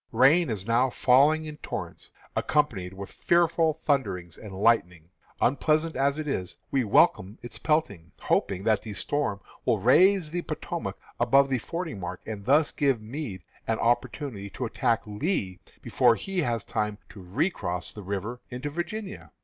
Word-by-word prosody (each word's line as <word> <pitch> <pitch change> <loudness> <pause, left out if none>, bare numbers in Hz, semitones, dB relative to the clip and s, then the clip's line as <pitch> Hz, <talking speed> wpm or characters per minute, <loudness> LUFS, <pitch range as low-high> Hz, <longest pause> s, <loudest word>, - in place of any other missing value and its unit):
Rain 135 +8 +5
is 100 -4 -2
now 120 +3 +3
falling 145 +6 +4
in 155 -1 -7
torrents, - - -6 0.3
accompanied 115 -12 0
with 95 +1 -8
fearful 170 -2 +2
thunderings 95 - -1
and 105 - -10
lightnings. 95 -5 +1 0.3
Unpleasant 155 +5 +2
as 140 +2 +1
it 155 -1 -4
is, 95 -11 -3 0.2
we 135 -2 +2
welcome 100 -1 +3
its 120 - -7
peltings, 100 - 0
hoping 95 -1 0
that 110 -1 +2
the 110 - -7
storm 105 0 -1 0.2
will - - +2
raise 180 - +4
the 175 +1 -2
Potomac - - -5 0.2
above 135 0 +4
the 130 - +2
fording 165 - -5
mark, 90 0 -5
and 105 -2 -6
thus 145 +5 +4
give 135 -5 +1
Meade 110 - -6 0.2
an 115 - +1
opportunity 120 -2 -1
to 125 - -4
attack 115 0 0
Lee 105 - -2 0.2
before 120 -2 +4
he 195 +8 -4
has 115 -6 -1
time 105 -1 -2
to 100 -1 -11
recross 90 - -2
the 105 - -9
river 100 +5 -4
into 125 +4 -5
Virginia. 190 +6 -5
120 Hz, 155 wpm, -27 LUFS, 100-150 Hz, 0.3 s, Rain